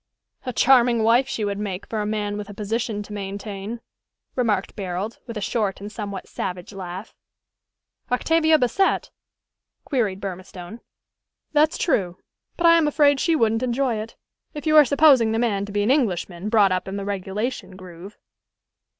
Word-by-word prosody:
"A - - 0
charming 240 -2 +4
wife 235 +4 +4
she 220 -5 -2
would 200 0 -2
make, 195 -3 -4
for 220 -2 -3
a 210 - -2
man 210 -1 -2
with 210 0 -6
a 205 - -9
position 215 0 -2
to 210 - -10
maintain," 200 +2 -6 0.5
remarked 215 -6 0
Barold, 195 +2 -4
with 230 -2 -6
a - - -4
short 205 -2 -1
and 205 +1 -8
somewhat 200 -3 -6
savage 180 +2 -5
laugh. 185 +1 -7 1.0
"Octavia 315 +5 +3
Bassett?" 300 +9 +1 0.7
queried 215 -9 -1
Burmistone. 185 +1 -7 0.7
"That's 305 +1 +3
true. 185 - 0 0.4
But 345 - 0
I 335 0 +7
am 310 - +2
afraid 285 -2 +3
she 330 +2 +2
wouldn't 225 -4 +2
enjoy 250 -1 0
it 215 +2 -7 0.4
if 295 - -6
you 310 0 +3
are 300 -1 +9
supposing 270 -5 +5
the - - 0
man 210 -4 0
to - - -8
be 205 0 0
an 220 - +2
Englishman, 195 - 0
brought 210 -4 +4
up 185 0 -1
in 190 - -4
the 200 - -4
regulation 200 +1 -4
groove." 185 +1 -11
215 Hz, 165 wpm, -23 LUFS, 195-250 Hz, 1.0 s, are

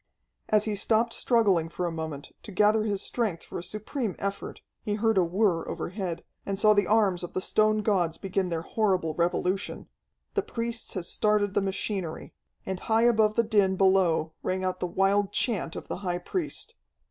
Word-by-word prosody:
As 215 -1 +3
he 215 -2 -1
stopped 225 +3 +2
struggling 200 -9 +2
for 180 +2 -3
a 170 - -1
moment, 160 -3 -5
to - - -10
gather 210 +3 +3
his 200 -2 -1
strength 215 -9 -2
for - - -6
a - - -6
supreme 215 +2 -3
effort, 200 0 -4 0.2
he 210 -3 -2
heard 225 +1 +2
a 190 - +4
whir 175 -1 +1
overhead, 185 -3 -4 0.2
and 195 -1 -3
saw 215 +1 +5
the 205 -2 +2
arms 205 -5 +3
of 175 - -6
the - - 0
stone 215 +2 +2
gods 180 -6 +1
begin 190 -1 -1
their 165 -1 -2
horrible 185 -6 0
revolution. 180 +3 -1 0.4
The 410 - +1
priests 235 - -3
had 180 -3 -3
started 210 -1 +2
the - - +2
machinery. 190 -3 -3 0.3
And 190 -1 -3
high 225 +2 +2
above 220 -3 +4
the 235 - +3
din 205 -4 +2
below 185 -5 +3
rang 185 0 -2
out 185 0 -1
the 180 - -1
wild 195 +3 +2
chant 210 -9 0
of - - -7
the - - -4
high 180 -2 -2
priest. 305 - -3
195 Hz, 185 wpm, -27 LUFS, 180-215 Hz, 0.4 s, saw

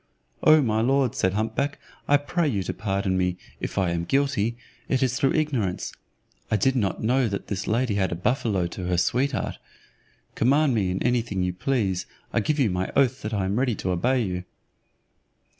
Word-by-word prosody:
"O 155 -1 +6
my 110 -2 +1
lord," 130 0 +2
said 95 0 +1
hump 110 +2 -1
back, 140 +4 -1 0.3
"I 145 - +6
pray 155 +4 -1
you 100 -9 0
to - - -3
pardon 95 -2 -1
me, 90 -1 0 0.2
if - - -5
I 95 -3 +2
am 85 0 -1
guilty, 135 -3 +1 0.3
it 130 0 +2
is 125 -1 +1
through 135 0 +2
ignorance. 130 - -1 0.6
I - - +2
did 130 +7 +2
not 105 -5 -1
know 125 +2 +2
that 100 -2 -4
this 100 -1 -3
lady 115 +1 +1
had 95 -2 0
a - - -1
buffalo 100 -1 0
to 90 +1 -5
her 90 -1 +1
sweetheart: 125 +8 0 0.7
command 140 +3 +3
me 100 -5 +1
in 90 +1 -2
anything 115 -6 0
you 90 0 -1
please, 100 -4 -1 0.3
I - - +3
give 150 +8 0
you 125 -9 +2
my 90 +1 -2
oath 130 -1 +3
that 105 - -4
I 95 -2 0
am 100 +5 0
ready 125 -3 +1
to 95 - -2
obey 125 +8 +1
you." 90 -3 -3
110 Hz, 195 wpm, -25 LUFS, 95-130 Hz, 0.7 s, O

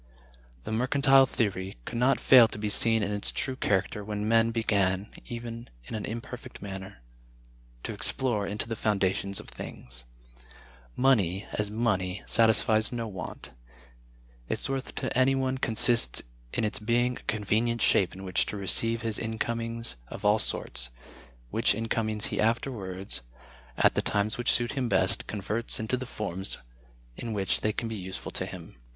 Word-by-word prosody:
The - - -6
Mercantile 135 +3 +4
Theory 95 - -2
could 115 - -4
not 130 +3 +3
fail 125 -3 +8
to 110 - -8
be 105 0 -2
seen 110 +1 +4
in 100 - -2
its 105 0 +1
true 130 - -2
character 105 -2 0
when 105 0 -3
men 115 0 +4
began, 100 -3 0 0.2
even 115 0 -7 0.2
in - - -9
an 110 -2 -3
imperfect 115 +2 -7
manner, 95 -9 -8 0.8
to - - -4
explore 115 -6 0
into 105 +3 -3
the 115 - -3
foundations 100 -2 0
of - - -11
things. 60 0 -9 0.9
Money, 105 -8 +2
as 105 -1 -1
money, 100 -4 -1
satisfies 110 -1 +3
no 115 -2 -3
want; 95 -5 -8 1.0
its - - -2
worth 135 -1 -4
to 130 - -3
any 130 +1 +4
one 130 0 -1
consists 115 - +6 0.3
in - - -1
its 105 - 0
being 120 +3 +1
a - - -16
convenient 110 +2 0
shape 95 - +4
in 95 - -9
which 90 -1 0
to 105 - -4
receive 115 +4 +2
his 110 -2 0
incomings 115 - -3
of - - -8
all 105 +1 +4
sorts, 60 -10 0 0.6
which - - +2
incomings 110 -1 0
he - - 0
afterwards, 105 - -2 0.6
at - - +4
the - - +1
times 105 +1 0
which 120 - +1
suit 120 -1 +1
him 130 -3 -2
best, - - +2
converts 105 +3 -2
into 110 +3 -1
the 130 0 -5
forms 95 -4 -4 0.6
in 115 - -5
which 95 -3 +1
they 110 - +1
can 115 +2 -4
be 115 - -5
useful 95 -1 -6
to - - -2
him. - - -10
110 Hz, 160 wpm, -28 LUFS, 100-120 Hz, 1.0 s, fail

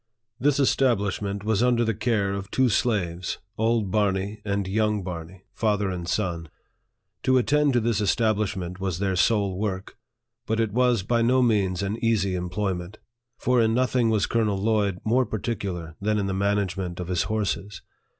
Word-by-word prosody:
This 145 +1 +2
establishment 100 -7 +1
was 110 0 +1
under 120 -1 +3
the 115 - +1
care 105 -3 0
of 100 0 -5
two 130 +2 +2
slaves 95 -7 0 0.2
old 110 -3 +1
Barney 100 0 0
and 100 -2 -1
young 105 0 0
Barney 90 +1 -7
father 105 -3 0
and 85 -2 -5
son. 85 -6 -2 0.7
To 130 0 +3
attend 145 +3 +2
to 120 - +4
this 115 -2 0
establishment 100 -4 0
was 95 -3 -2
their 95 0 0
sole 100 -1 +2
work. 95 -3 -4 0.5
But 110 +1 0
it 110 -2 +1
was 125 -4 +2
by 115 +3 +1
no 125 +2 +3
means 100 -5 +1
an 105 +4 -3
easy 105 -5 +2
employment; 90 +1 -3 0.4
for 125 -1 +2
in 110 0 +2
nothing 125 -2 +2
was 110 -2 +2
Colonel 110 -4 0
Lloyd 100 -2 +1
more 125 +4 +3
particular 95 -7 -4
than 105 +1 +1
in 100 - 0
the 95 - -2
management 95 -2 -1
of 90 - -4
his 90 -1 0
horses. 105 -2 -2
105 Hz, 165 wpm, -25 LUFS, 95-115 Hz, 0.7 s, to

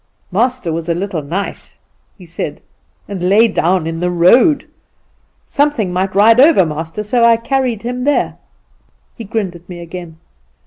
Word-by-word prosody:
'Master 230 -3 0
was 165 +1 -4
a 170 - +1
little 185 -2 -3
nice,' 175 +8 -4 0.4
he 185 - -14
said, 165 0 -5 0.5
'and 185 -3 -3
lay 220 +4 +5
down 185 -4 0
in 165 0 -4
the 180 +1 0
road. 185 - +4 0.8
Something 280 -11 0
might 190 +1 -1
ride 225 +4 +5
over 280 - +6
master, 160 +6 -5
so 235 +3 +1
I 230 -1 +5
carried 245 -2 -1
him 250 +1 -3
there.' 290 +1 0 0.8
He 230 - -8
grinned 200 -3 -3
at 175 +1 -15
me 175 -1 -8
again. 170 -1 -9
195 Hz, 155 wpm, -16 LUFS, 175-235 Hz, 0.8 s, over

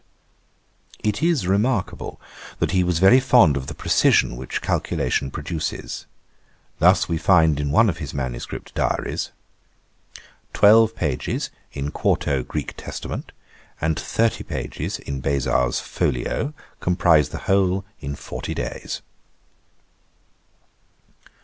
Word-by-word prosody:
It 105 +4 0
is 165 - +2
remarkable, 105 +2 0 0.4
that - - 0
he 95 -1 +3
was 90 -2 +1
very 95 +9 +7
fond 120 - +5
of 65 -1 -4
the - - -6
precision - - +3
which 65 +1 -4
calculation 70 - -1
produces. 75 +3 -5 0.7
Thus - - +5
we 80 - -1
find 80 -6 +4
in 75 -1 -1
one 110 +10 +5
of 90 - -1
his 75 -5 -5
manuscript 65 -3 -5
diaries, - - -1 1.2
'12 110 +2 +6
pages 75 -6 -2 0.2
in 70 +1 -3
4to. 70 -3 0
Gr. 75 - -2 0.2
Test, - - -7 0.7
and 80 0 0
30 115 +5 0
pages - - -4
in 70 -1 -6
Beza's 65 -3 +1
folio, 140 - -2 0.2
comprize 85 -5 +3
the - - -6
whole 95 0 +2
in 70 -2 -5
40 - - -6
days.' - - -4
80 Hz, 115 wpm, -22 LUFS, 70-100 Hz, 1.2 s, very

